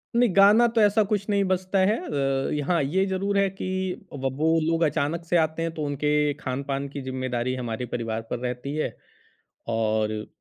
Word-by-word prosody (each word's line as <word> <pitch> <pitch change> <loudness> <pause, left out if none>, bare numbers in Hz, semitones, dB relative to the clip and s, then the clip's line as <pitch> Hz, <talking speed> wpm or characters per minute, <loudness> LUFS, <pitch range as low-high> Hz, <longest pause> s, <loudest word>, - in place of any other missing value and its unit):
नहीं 240 0 +4
गाना 210 +4 +7
तो 230 -1 +1
ऐसा 210 +1 +4
कुछ 205 -1 -1
नहीं 200 -1 +2
बजता 185 +1 0
है। 200 +4 +3 0.5
अ, - - -2
यहाँ 150 +3 +1
ये 185 +8 +1
ज़रूर 195 +1 -1
है 195 -1 +3
कि 195 0 -6 0.5
अब 135 -2 -2
वो 160 +2 +3
लोग 165 0 +2
अचानक 160 +2 0
से 175 +1 +2
आते 160 0 0
हैं 165 - -1
तो 155 - -4
उनके 150 +1 +1
खान-पान 140 0 -3
की 140 0 -6
ज़िम्मेदारी 130 -1 -2
हमारे 120 -1 -4
परिवार 115 -2 -3
पर 125 - -3
रहती 125 +3 -4
है 155 - -2 0.7
और 110 -1 0
150 Hz, 185 wpm, -25 LUFS, 130-190 Hz, 0.7 s, गाना